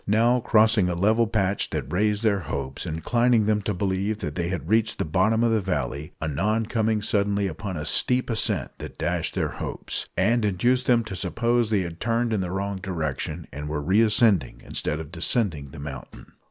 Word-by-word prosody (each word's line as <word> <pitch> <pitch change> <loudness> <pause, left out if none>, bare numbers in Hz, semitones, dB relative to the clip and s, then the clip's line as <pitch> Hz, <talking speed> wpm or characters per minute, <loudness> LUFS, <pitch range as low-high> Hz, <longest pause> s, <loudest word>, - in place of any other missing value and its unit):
Now 115 +4 +3
crossing 110 -4 +4
a 90 - -1
level 110 +6 +3
patch 100 -2 0
that 70 - -4
raised 105 +3 +1
their 105 -3 +2
hopes, 70 -1 -5
inclining 115 +8 +2
them 105 0 +1
to 105 - -2
believe 100 +2 -1
that - - -3
they 85 -1 -2
had 90 -2 -4
reached 110 +2 +2
the - - -1
bottom 95 +8 +2
of 115 - +3
the 110 -1 +2
valley; 75 -5 -3
anon 95 +9 0
coming 110 -1 0
suddenly 100 -2 +1
upon 95 +1 -4
a 75 - -4
steep 125 +9 +1
ascent 115 -2 0
that - - -8
dashed 85 0 -2
their - - 0
hopes, - - -4
and 115 +5 +2
induced 120 +7 +1
them 120 -3 +4
to 110 -3 -7
suppose 120 +4 0
they 105 -3 +2
had 85 -2 -6
turned 115 0 0
in 105 - 0
the 90 - -3
wrong 100 +2 -3
direction, 80 -3 -4
and 75 +1 -5
were 75 0 -2
re 95 +9 +3
ascending 105 - +3
instead 75 - -2
of 80 -1 -8
descending 85 - +1
the 70 +3 -12
mountain. 70 -2 -9
100 Hz, 195 wpm, -25 LUFS, 85-110 Hz, -, crossing